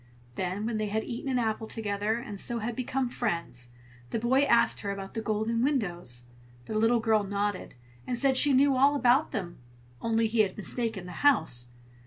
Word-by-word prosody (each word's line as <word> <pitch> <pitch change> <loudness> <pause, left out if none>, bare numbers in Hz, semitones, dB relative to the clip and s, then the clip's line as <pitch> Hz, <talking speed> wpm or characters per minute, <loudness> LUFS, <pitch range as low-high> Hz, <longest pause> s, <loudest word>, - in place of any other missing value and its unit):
Then 185 +5 -3
when 225 -1 -1
they 215 0 -1
had 220 +2 -1
eaten 245 +3 -5
an 255 - +1
apple 220 -1 -1
together, 210 -1 -1
and 215 -5 -6
so 240 - 0
had 230 +1 -3
become 255 +1 -1
friends, 170 - -3 0.4
the - - -1
boy 240 +4 +2
asked 235 -4 +3
her 200 - -4
about 195 -1 -5
the 225 - -3
golden 220 +2 -1
windows. 175 - -1 0.4
The - - -6
little 225 +2 +3
girl 220 -2 +2
nodded, 205 -3 -3 0.3
and 245 - -1
said 270 +1 +2
she 290 +2 +4
knew 275 +1 +4
all 280 +3 +4
about 255 +2 +3
them, 175 -7 -5 0.4
only 225 0 +1
he 220 +1 -1
had 200 -3 +2
mistaken 220 -2 -3
the 180 - -8
house. 160 - +3
220 Hz, 190 wpm, -28 LUFS, 200-245 Hz, 0.4 s, she